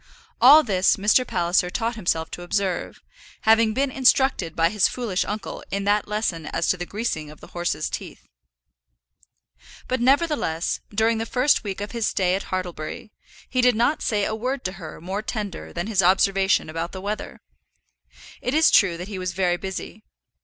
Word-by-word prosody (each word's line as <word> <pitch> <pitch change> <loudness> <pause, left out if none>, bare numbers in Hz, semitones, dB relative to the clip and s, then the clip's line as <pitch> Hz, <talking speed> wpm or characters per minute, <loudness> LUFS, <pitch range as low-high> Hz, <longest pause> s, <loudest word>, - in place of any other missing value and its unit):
All 290 +6 +9
this 190 -6 +2
Mr. 215 +5 +3
Palliser 175 +1 +1
taught 230 +5 -2
himself 170 -6 -1
to - - -7
observe, 185 0 -2 0.4
having 220 0 +4
been 275 0 0
instructed 260 - +2
by 165 0 +3
his 210 -3 +3
foolish 225 -7 -2
uncle 210 0 -5
in 200 0 -2
that 205 +1 +1
lesson 205 -7 -2
as - - -2
to 185 - +2
the 175 0 -5
greasing 200 -8 -3
of 150 - -13
the - - -14
horses' 175 -3 -2
teeth. - - -7 1.6
But, 255 -1 -1
nevertheless, 270 - +1
during 220 +2 +1
the 225 - -3
first 255 +5 +2
week 200 -1 -5
of 205 - -5
his 230 -2 -1
stay 185 -2 +1
at 195 - -2
Hartlebury, 185 +3 -5 0.4
he 255 - 0
did 250 -2 +4
not 240 +7 +1
say 205 -2 0
a - - -2
word 250 +4 -3
to 185 - -2
her 160 -2 -8
more 190 +5 -4
tender 210 -4 -5
than 175 +1 -4
his 205 -3 +2
observation 190 +1 +3
about 165 +2 -4
the 190 - -6
weather. 205 +2 -5 1.0
It 250 - -1
is 320 +1 +5
true 185 -5 +4
that 180 +2 -7
he 200 -3 -6
was 185 -1 -3
very 180 -1 +1
busy. 190 0 -6
200 Hz, 180 wpm, -23 LUFS, 180-230 Hz, 1.6 s, All